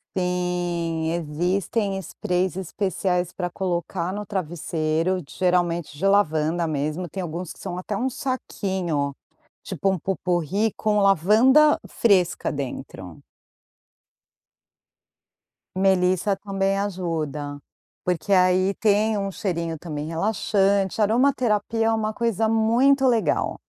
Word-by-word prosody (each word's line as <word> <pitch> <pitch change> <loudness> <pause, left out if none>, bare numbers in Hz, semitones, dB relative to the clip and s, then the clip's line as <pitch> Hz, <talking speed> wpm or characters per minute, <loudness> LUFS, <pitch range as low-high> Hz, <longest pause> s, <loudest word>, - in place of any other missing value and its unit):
Sim, 175 -3 -1
existem 180 +5 -1
sprays 180 0 -2
especiais 185 -1 -1
para 180 0 -3
colocar 175 -1 -2
no 210 +1 -5
travesseiro, 170 -1 -1
geralmente 175 -3 0
de 190 - -2
lavanda 170 -4 +2
mesmo, 155 +4 -2
tem 190 +4 -6
alguns 175 0 -5
que - - -20
são 175 - -5
até 185 +3 -4
um 250 +6 0
saquinho, 190 - -2 0.5
tipo 195 - -1
um 190 - -2
pot-pourri 190 +3 -1
com 210 -1 +1
lavanda 220 - +5
fresca 185 -6 +2
dentro. 125 - -6 2.6
Melissa 190 +1 +2
também 195 -1 -1
ajuda, 160 -7 -3 0.4
porque 180 +2 -2
aí 185 +1 +4
tem 215 -1 +2
um 195 -1 -2
cheirinho 170 -4 -3
também 150 -2 -5
relaxante, 195 +3 +1
aromaterapia 225 -1 +2
é - - +3
uma 215 -1 -1
coisa 225 -1 0
muito 245 +5 +3
legal. 235 -3 +1
185 Hz, 105 wpm, -24 LUFS, 170-205 Hz, 2.6 s, lavanda